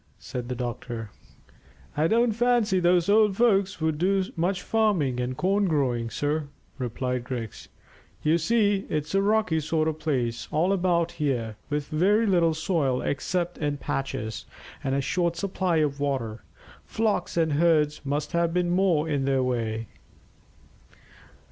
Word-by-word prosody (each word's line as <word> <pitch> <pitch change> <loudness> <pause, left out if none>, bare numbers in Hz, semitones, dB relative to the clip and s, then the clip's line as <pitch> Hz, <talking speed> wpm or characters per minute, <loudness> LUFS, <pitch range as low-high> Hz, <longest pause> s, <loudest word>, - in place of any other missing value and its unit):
said 125 -1 -6
the 125 - -2
doctor. 120 -2 -5 0.8
"I 155 +2 +2
don't 230 +4 +3
fancy 235 -4 +2
those 175 -1 +3
old 210 -1 +4
folks 200 -6 +2
would 160 -1 -1
do 190 +2 +2
much 180 +3 -1
farming 185 - +1
and 125 +1 -3
corn 200 +2 +2
growing, 130 -8 0
sir," 145 +4 -1 0.3
replied 125 0 -2
Griggs. 120 -4 -6 0.5
"You 160 +2 +3
see, 205 +2 +1
it's 150 +1 -2
a 195 - +3
rocky 205 -5 +2
sort 155 +1 0
of 155 -1 -2
place 125 -7 -1
all 170 +6 +2
about 175 -3 +1
here, 120 -7 -2
with 150 -1 -2
very 200 +8 +3
little 170 -5 +3
soil 155 -6 0
except 175 +4 -2
in 145 -2 -1
patches, 130 -6 -4 0.4
and 135 -1 0
a 140 - +1
short 170 +3 0
supply 185 -1 -1
of 145 -3 0
water. 130 -6 -2 0.4
Flocks 220 -5 -1
and 160 -2 +2
herds 150 -1 +2
must 145 +2 -2
have 170 -1 +1
been 175 -1 +1
more 175 -4 +2
in 145 -3 0
their 135 -1 +2
way." 115 -3 -2
155 Hz, 150 wpm, -26 LUFS, 135-185 Hz, 0.8 s, old